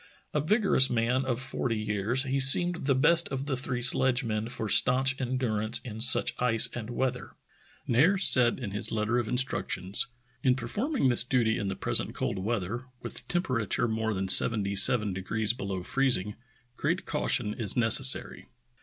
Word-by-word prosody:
A 150 - -1
vigorous 185 - +2
man 125 +3 -1
of 125 -2 -3
forty 125 -3 -3
years, 110 +4 -1
he 135 0 -3
seemed 175 +4 +5
the 135 - +2
best 165 +5 +3
of 135 0 -5
the 140 -2 -3
three 125 -1 -5
sledgemen 120 -4 0
for 110 -2 -5
stanch 130 +4 +3
endurance 120 -3 -2
in 110 -3 -8
such 125 +3 +2
ice 115 -3 +5
and 115 -2 -7
weather. 125 0 -4 0.5
Nares 180 +11 +2
said 120 -3 +5
in 120 -7 -7
his 105 - -4
letter 110 +2 -1
of 120 - -4
instructions: 100 -6 -1 0.3
"In 130 -2 +1
perform 205 - -5
ing 135 - +1
this 120 -1 +2
duty 120 -3 -1
in 100 - -4
the 95 - -4
present - - -1
cold - - -4
weather, 110 +3 -4 0.2
with - - -8
the - - -13
temperature 130 - -2
more 110 -1 -3
than 95 0 -4
seventy 100 0 +4
seven 105 +1 +5
degrees 105 +4 -3
below 100 -7 -6
freezing, 120 -5 -1 0.4
great - - -3
caution 105 - -2
is 105 -2 -3
necessary." 125 +3 0
120 Hz, 170 wpm, -27 LUFS, 110-130 Hz, 0.5 s, seemed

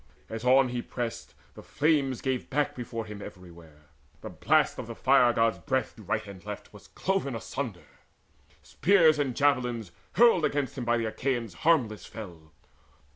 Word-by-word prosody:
As 110 +1 -6
on 130 +1 +5
he 120 0 -3
pressed, 120 -2 -5 0.2
The - - -11
flames 145 -4 +1
gave 130 -2 -2
back 145 +1 0
before 115 -2 -5
him 105 -1 -9
everywhere: 85 -6 -12 0.4
The - - -7
blast - - +2
of - - -6
the - - -7
Fire 120 -1 +4
god's 115 -1 +1
breath 130 -3 -2
to 110 - -13
right 105 +2 -2
and 100 -3 -11
left - - -8
Was - - -14
cloven 190 -10 -2
asunder. 110 - -5 0.8
Spears 160 -3 +4
and 135 -4 -1
javelins 125 - +1 0.2
hurled 230 -8 +5
Against 145 -5 -1
him 125 -3 -4
by 120 0 +2
the 115 - -1
Achaeans 120 -2 -2
harmless 115 - +1
fell. 85 -8 -10
120 Hz, 165 wpm, -28 LUFS, 110-140 Hz, 0.8 s, on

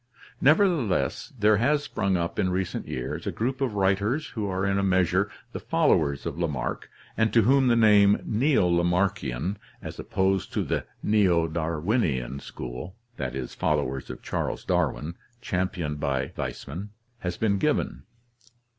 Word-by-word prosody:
Nevertheless 155 - +2
there 105 -1 +4
has 145 +6 +2
sprung 95 -9 0
up 85 0 -2
in 95 - +2
recent 90 0 -2
years 65 - -4
a - - 0
group 130 +4 -2
of 125 -6 0
writers 100 +9 +1
who 110 -4 -3
are 95 +1 -1
in 100 0 +1
a - - 0
measure 95 +1 +2 0.2
the - - -5
followers 85 - +1
of 75 - -4
Lamarck 75 -7 -2 0.3
and 110 -1 +2
to 115 - +5
whom 135 +3 +4
the 120 - +4
name 105 -3 +6
Neo 130 0 +2
Lamarckian, 85 -2 0 0.2
as - - -8
opposed 95 0 0
to - - 0
the - - -2 0.2
Neo 95 -6 +3
Darwinian 80 - -1
school 65 +9 -7 0.2
(followers 65 0 -2
of - - -8
Charles - - -3
Darwin, 75 +3 0 0.3
championed 90 -8 -2
by 65 -3 -1
Weismann), 90 +9 -5 0.3
has 90 -1 -3
been 100 -3 +1
given. 65 - 0
95 Hz, 145 wpm, -26 LUFS, 80-110 Hz, 0.3 s, name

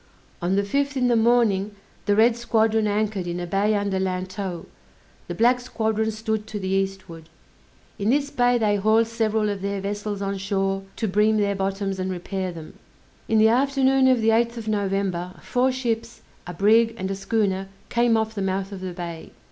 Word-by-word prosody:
On 175 +2 +1
the 200 - +2
fifth, 280 +6 -1
in 250 -1 +2
the 240 - +3
morning, 220 -3 +2 0.3
the 205 - +3
red 225 +2 +5
squadron 225 -2 +1
anchored 205 -3 -1
in 175 0 -3
a 175 - -3
bay 200 +4 +1
under 200 -2 -1
Lantow; 185 -1 -3 0.6
the - - -5
black 245 +2 +3
squadron 220 -3 -1
stood 220 0 -3
to 215 - -5
the 190 -1 -4
eastward. 190 -4 -3 0.7
In 200 +2 0
this 285 +2 +1
bay 245 0 +3
they 210 -3 +2
hauled 220 +3 +3
several 220 -1 0
of 200 -2 -3
their 200 0 -2
vessels 205 +1 -4
on 195 0 -3
shore 195 0 -1
to 225 - -2
bream 210 +3 +3
their 200 -1 +1
bottoms 195 0 -2
and 185 0 -2
repair 185 +1 -3
them. 165 -2 -11 0.5
In 225 - +2
the 220 +1 +6
afternoon 270 +1 +3
of 255 -3 +3
the 220 - +3
8th 235 +1 +2
of 225 -1 -7
November, 195 -3 -1
four 255 +1 +1
ships, 230 -3 -3 0.3
a 175 - -5
brig 225 +4 +4
and 190 -1 -3
a - - -2
schooner 195 -1 -1 0.2
came 235 -1 +3
off 220 0 -1
the 205 - -4
mouth 195 +1 -2
of 195 -2 -7
the 185 -1 -5
bay. 170 -2 -7
210 Hz, 190 wpm, -24 LUFS, 195-225 Hz, 0.7 s, the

